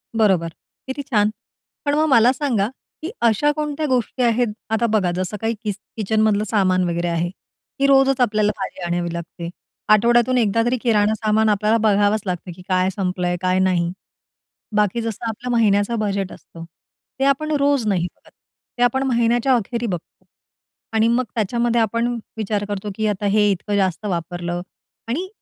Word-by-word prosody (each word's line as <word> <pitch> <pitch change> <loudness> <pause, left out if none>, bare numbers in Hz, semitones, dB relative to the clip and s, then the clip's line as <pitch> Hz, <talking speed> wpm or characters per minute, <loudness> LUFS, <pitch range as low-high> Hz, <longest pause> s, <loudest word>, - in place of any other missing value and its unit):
बरोबर. 190 -7 +3 0.4
किती 265 +2 -4
छान! 210 -6 +2 0.6
पण 285 0 +2
मग 310 +1 +3
मला 240 -2 +6
सांगा, 250 -8 0 0.3
की 330 +5 -4 0.2
अशा 265 +7 +3
कोणत्या 300 0 -2
गोष्टी 250 0 0
आहेत? 240 +1 +2 0.2
आता 220 +1 +1
बघा, 190 -5 +2
जसं 185 +3 -3
काही 225 +1 0
कि 210 - -1 0.3
किचनमधलं 215 0 +2
सामान 185 -4 +2
वगैरे 170 +1 -1
आहे, 170 +1 -1 0.5
की 275 - +3
रोजच 270 -1 +4
आपल्याला 215 -3 +2
भाजी 190 -1 -6
आणावी 175 0 -2
लागते. 170 0 -6 0.4
आठवड्यातून 240 +3 +4
एकदा 230 -1 +2
तरी 245 +2 +1
किराणा 215 -3 +3
सामान 220 0 +2
आपल्याला 210 +2 +2
बघावंच 205 +1 +3
लागतं, 180 -1 -4
की 180 - -13
काय 185 0 +2
संपलंय, 180 -2 -1
काय 185 0 +1
नाही. 180 -2 +1 0.8
बाकी 210 +2 +2
जसं 225 0 -4
आपलं 245 +3 -5
महिन्याचं 220 -1 +2
बजेट 200 -2 -1
असतं, 165 - -12 0.6
ते 270 - +2
आपण 310 +3 -5
रोज 280 -4 +2
नाही 180 -4 +1
बघत, - - -23 0.5
ते 245 - +2
आपण 265 +2 +2
महिन्याच्या 240 +1 +2
अखेरी 235 +1 -2
बघतो. 175 -4 -7 0.7
आणि, 220 0 +3
मग 235 +2 +2
त्याच्यामध्ये 235 +2 +1
आपण 230 +2 0 0.2
विचार 210 -1 -1
करतो, 205 0 -3
की 220 +1 0
आता 205 -1 -2
हे 210 +1 +3
इतकं 200 +2 -2
जास्त 190 0 0
वापरलं. 175 -1 -3 0.5
आणि, 310 +11 -2
215 Hz, 165 wpm, -21 LUFS, 190-240 Hz, 0.8 s, मला